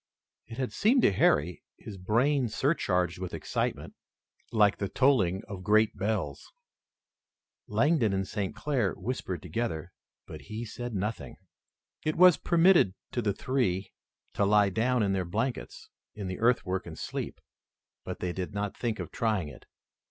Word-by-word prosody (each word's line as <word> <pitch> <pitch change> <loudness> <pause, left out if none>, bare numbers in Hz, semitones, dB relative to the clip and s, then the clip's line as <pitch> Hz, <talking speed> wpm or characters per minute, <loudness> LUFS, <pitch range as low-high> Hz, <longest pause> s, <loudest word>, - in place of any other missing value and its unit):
It 115 - -9
had 130 -2 -2
seemed 245 +4 +3
to - - +6
Harry, 85 -2 +2 0.2
his 105 -3 -9
brain 125 +7 +2
surcharged 90 - 0
with 90 -1 -5
excitement, - - -3 0.6
like 105 -2 +4
the 100 - -2
tolling 110 -9 +2
of 100 -3 -7
great 110 +2 +3
bells. 100 -7 -3 1.2
Langdon 145 -10 +2
and 95 0 -1
St. 100 -1 -3
Clair 120 -5 0
whispered 95 -4 -4
together, 90 -2 -3 0.3
but 75 - -9
he 110 +11 -6
said 120 +1 -6
nothing. 105 +4 -4 0.7
It 155 - 0
was 180 -1 +7
permitted 170 - +4 0.2
to 120 - -1
the 105 -3 0
three 100 -6 -1 0.4
to - - +1
lie 100 0 +4
down 115 +3 +1
in 100 -1 +1
their 95 -1 0
blankets 115 +9 -4 0.2
in 105 - -6
the 90 0 -4
earthwork 95 -6 +1
and - - -8
sleep, - - -5 0.6
but - - -6
they 90 -1 -2
did 95 +2 -5
not 100 -1 -2
think 115 -3 -2
of - - -6
trying 105 -9 -1
it. - - -14
105 Hz, 150 wpm, -29 LUFS, 95-125 Hz, 1.2 s, was